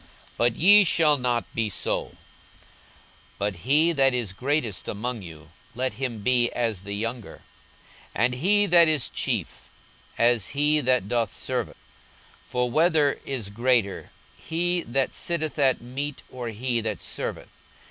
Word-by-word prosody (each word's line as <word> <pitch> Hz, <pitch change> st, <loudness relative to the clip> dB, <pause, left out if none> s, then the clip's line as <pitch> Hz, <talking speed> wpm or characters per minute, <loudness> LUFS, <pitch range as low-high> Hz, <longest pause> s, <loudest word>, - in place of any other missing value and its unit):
42:022:026 -, -, -23 dB, 0.3 s
But 120 Hz, -1 st, +2 dB
ye 205 Hz, +5 st, +7 dB
shall 155 Hz, -4 st, +3 dB
not 120 Hz, -2 st, -2 dB
be 115 Hz, -2 st, -1 dB
so: 95 Hz, -, -3 dB, 1.2 s
but 100 Hz, -1 st, -2 dB
he 145 Hz, -, +3 dB
that 135 Hz, -4 st, +3 dB
is 115 Hz, -6 st, -2 dB
greatest 125 Hz, -5 st, -2 dB
among 115 Hz, +2 st, -4 dB
you, 80 Hz, -3 st, -12 dB, 0.3 s
let 130 Hz, +1 st, -2 dB
him 120 Hz, -5 st, -4 dB
be 120 Hz, -1 st, +3 dB
as 115 Hz, -6 st, -1 dB
the 100 Hz, +1 st, -6 dB
younger; 115 Hz, +1 st, -5 dB, 0.7 s
and 120 Hz, +3 st, +2 dB
he 200 Hz, +10 st, +2 dB
that 170 Hz, -3 st, +6 dB
is 155 Hz, -5 st, +1 dB
chief, -, -, -3 dB, 0.5 s
as 115 Hz, -4 st, +2 dB
he 150 Hz, +1 st, +3 dB
that 125 Hz, -7 st, +1 dB
doth 115 Hz, +1 st, 0 dB
serve. -, -, -2 dB
42:022:027 -, -, -16 dB, 0.7 s
For 125 Hz, -1 st, -2 dB
whether 155 Hz, -1 st, +3 dB
is 125 Hz, -7 st, -3 dB
greater, 115 Hz, -2 st, 0 dB, 0.3 s
he 175 Hz, +2 st, -1 dB
that 135 Hz, +2 st, 0 dB
sitteth 160 Hz, -3 st, -2 dB
at 135 Hz, -2 st, +3 dB
meat, 135 Hz, +4 st, -5 dB
or 125 Hz, -2 st, -6 dB
he 120 Hz, +2 st, -2 dB
that 110 Hz, -4 st, -3 dB
serveth? -, -, -5 dB
125 Hz, 145 wpm, -25 LUFS, 115-150 Hz, 1.2 s, ye